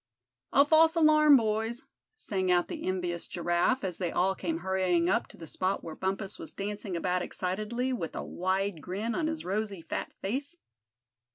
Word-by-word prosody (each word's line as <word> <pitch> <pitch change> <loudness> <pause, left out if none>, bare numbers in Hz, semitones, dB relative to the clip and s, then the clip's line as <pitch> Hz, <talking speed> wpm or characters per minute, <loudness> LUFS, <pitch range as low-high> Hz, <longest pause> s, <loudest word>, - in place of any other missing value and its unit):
"A 280 - +6
false 320 +2 +5
alarm, 305 -2 +6
boys!" 225 +1 -1 0.3
sang 190 - -1
out 175 -1 +2
the - - -5
envious 180 -2 -2
Giraffe, 175 +9 +1
as 180 -3 -3
they 175 -3 -1
all 190 +2 +2
came 170 -3 -3
hurrying 185 -2 +1
up - - +1
to - - -15
the 165 - -9
spot 185 +5 -2
where 165 - -6
Bumpus 195 +1 -2
was - - -8
dancing 200 -2 -4
about 180 +1 0
excitedly, 215 +9 -2
with 170 -10 -4
a - - -3
wide 185 -1 -1
grin 200 +8 -3
on 315 +2 0
his 320 0 -3
rosy 200 0 -2
fat 165 - -4
face. 275 - -3
195 Hz, 175 wpm, -29 LUFS, 180-235 Hz, 0.3 s, A